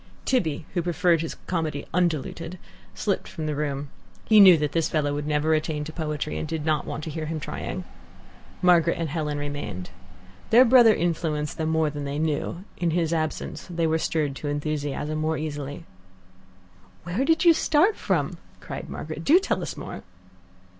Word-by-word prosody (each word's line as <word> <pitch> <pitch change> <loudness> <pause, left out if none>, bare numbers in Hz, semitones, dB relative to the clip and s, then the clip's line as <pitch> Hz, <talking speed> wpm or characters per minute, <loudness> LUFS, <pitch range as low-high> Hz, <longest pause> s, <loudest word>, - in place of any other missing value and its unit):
Tibby, 160 - 0
who 175 - +1
preferred 175 -1 +2
his 165 - -4
comedy 160 -5 -2
undiluted, 170 0 -1 0.4
slipped 200 -3 -1
from 160 - -6
the 155 - -1
room. 145 -1 -3 0.4
He 215 -1 +6
knew 185 -4 +9
that 150 -2 -1
this 165 0 +1
fellow 145 -2 0
would 145 0 -3
never 150 +1 +2
attain 155 -1 -1
to 155 +1 -7
poetry, 150 -2 -3
and - - -3
did 160 -1 -3
not 155 -2 0
want 155 - -4
to 160 - -5
hear 155 0 -4
him 160 0 -3
trying. - - -5 0.8
Margaret 170 -2 +4
and 165 -2 -2
Helen 150 -1 -2
remained. 145 -12 -5 0.6
Their 245 +3 +7
brother 240 -3 +7
influenced 155 -3 -1
them 160 0 0
more 160 -1 +2
than 145 -1 -5
they 140 +1 -3
knew: 160 +3 -2
in 175 - 0
his 165 0 0
absence 155 -1 -3
they 170 -1 0
were 160 0 +2
stirred 150 -4 -1
to 150 - -5
enthusiasm 145 +1 -2
more 155 0 0
easily. 145 0 -5 1.2
"Where 180 +10 -1
did 325 +4 +2
you 335 - +9
start 325 +6 +3
from?" - - -1 0.2
cried - - -7
Margaret. - - -6
"Do 315 +5 +6
tell 385 - -1
us - - -5
more." - - -7
160 Hz, 175 wpm, -25 LUFS, 150-175 Hz, 1.2 s, knew